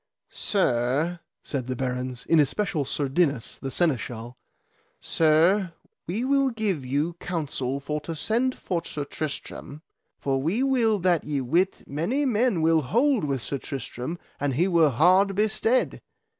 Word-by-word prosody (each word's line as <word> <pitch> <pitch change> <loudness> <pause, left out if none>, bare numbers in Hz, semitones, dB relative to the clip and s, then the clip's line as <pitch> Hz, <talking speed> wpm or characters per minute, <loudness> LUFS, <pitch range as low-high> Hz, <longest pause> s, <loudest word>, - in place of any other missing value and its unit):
Sir, 150 - 0 0.2
said 130 -4 -4
the 130 - -2
barons, 125 0 -3
in 165 - +4
especial 155 0 +1
Sir 140 +1 -1
Dinas, 140 -4 0
the 135 - -3
Seneschal, 125 - -1 0.6
Sir, 165 +4 +3 0.3
we 210 +9 -2
will 275 0 +3
give 210 - -1
you 145 +6 -1
counsel 140 -6 -2
for 150 +2 -3
to 165 +2 -5
send 240 +10 0
for 170 -2 -3
Sir 150 -3 -4
Tristram, 150 0 -6 0.3
for 135 -1 -1
we 185 - 0
will 240 -5 +3
that 175 -3 +2
ye 145 -2 -2
wit 170 +9 0
many 185 - -1
men 230 -7 +2
will 160 0 +4
hold 235 - +2
with 135 -5 -2
Sir 140 +7 -3
Tristram 135 +3 -5 0.2
an 145 -2 0
he 170 +8 +2
were 165 -4 +4
hard 185 +9 +4
bestead. 220 +4 +1
160 Hz, 145 wpm, -26 LUFS, 140-195 Hz, 0.6 s, in